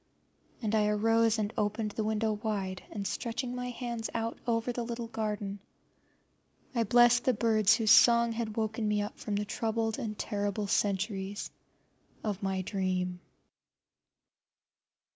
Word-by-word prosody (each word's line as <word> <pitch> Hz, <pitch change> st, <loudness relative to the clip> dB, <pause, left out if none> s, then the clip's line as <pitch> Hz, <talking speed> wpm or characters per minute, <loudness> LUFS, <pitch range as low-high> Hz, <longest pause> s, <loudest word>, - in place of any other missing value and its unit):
But 215 Hz, -1 st, 0 dB
I 210 Hz, -1 st, +3 dB
arose 225 Hz, +1 st, +3 dB
and 210 Hz, 0 st, -2 dB
opened 210 Hz, +1 st, -1 dB
the 220 Hz, -, -2 dB
window 215 Hz, 0 st, 0 dB
wide, 205 Hz, -4 st, -3 dB
and 200 Hz, -2 st, -5 dB
stretching 245 Hz, +4 st, -3 dB
my 250 Hz, 0 st, -3 dB
hands 235 Hz, -2 st, -4 dB
out 230 Hz, 0 st, -2 dB
over 230 Hz, +1 st, +1 dB
the 240 Hz, -, -3 dB
little 235 Hz, 0 st, -4 dB
garden, 210 Hz, -3 st, -3 dB, 1.1 s
I 230 Hz, -2 st, +1 dB
blessed 240 Hz, +2 st, +5 dB
the 255 Hz, -3 st, +3 dB
birds 220 Hz, -1 st, +4 dB
whose 220 Hz, -2 st, +2 dB
song 235 Hz, -1 st, +7 dB
had 225 Hz, -1 st, -4 dB
woken 220 Hz, 0 st, -1 dB
me 210 Hz, 0 st, +1 dB
up 205 Hz, -, -7 dB
from 210 Hz, -, -3 dB
the 205 Hz, +1 st, -1 dB
troubled 225 Hz, +2 st, -1 dB
and 215 Hz, -5 st, -4 dB
terrible 205 Hz, -1 st, -2 dB
centuries 200 Hz, 0 st, -1 dB, 0.7 s
of 205 Hz, -3 st, -2 dB
my 190 Hz, -1 st, -1 dB
dream. 185 Hz, -2 st, -1 dB
220 Hz, 145 wpm, -30 LUFS, 205-230 Hz, 1.1 s, song